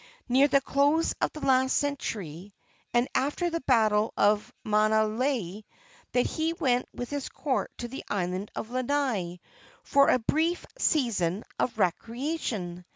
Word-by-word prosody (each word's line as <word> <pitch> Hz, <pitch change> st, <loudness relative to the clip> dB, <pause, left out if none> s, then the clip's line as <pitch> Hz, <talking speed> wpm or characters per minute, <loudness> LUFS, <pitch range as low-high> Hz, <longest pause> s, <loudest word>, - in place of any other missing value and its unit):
near 265 Hz, +3 st, +5 dB
the 275 Hz, 0 st, +4 dB
close 285 Hz, +4 st, +2 dB
of -, -, +1 dB
the 305 Hz, -, -7 dB
last 260 Hz, -1 st, +3 dB
century, 205 Hz, -, -4 dB, 0.4 s
and 240 Hz, +1 st, +2 dB
after 295 Hz, +6 st, 0 dB
the 335 Hz, 0 st, -2 dB
battle 220 Hz, -4 st, +3 dB
of 210 Hz, +1 st, +2 dB
Maunalei, 215 Hz, 0 st, +1 dB, 0.5 s
that 245 Hz, -, +3 dB
he 320 Hz, +1 st, -1 dB
went 250 Hz, -7 st, +1 dB
with 245 Hz, +2 st, -6 dB
his 285 Hz, -2 st, -3 dB
court 265 Hz, -1 st, -2 dB
to 240 Hz, -, -4 dB
the 265 Hz, +3 st, -7 dB
island 185 Hz, 0 st, -2 dB
of 220 Hz, -, -5 dB
Lanai 255 Hz, -9 st, -1 dB, 0.4 s
for 280 Hz, -1 st, +4 dB
a -, -, +5 dB
brief 320 Hz, +8 st, 0 dB
season 215 Hz, -, +1 dB, 0.2 s
of 235 Hz, -3 st, 0 dB
recreation. 220 Hz, -, -2 dB
245 Hz, 140 wpm, -28 LUFS, 210-280 Hz, 0.5 s, near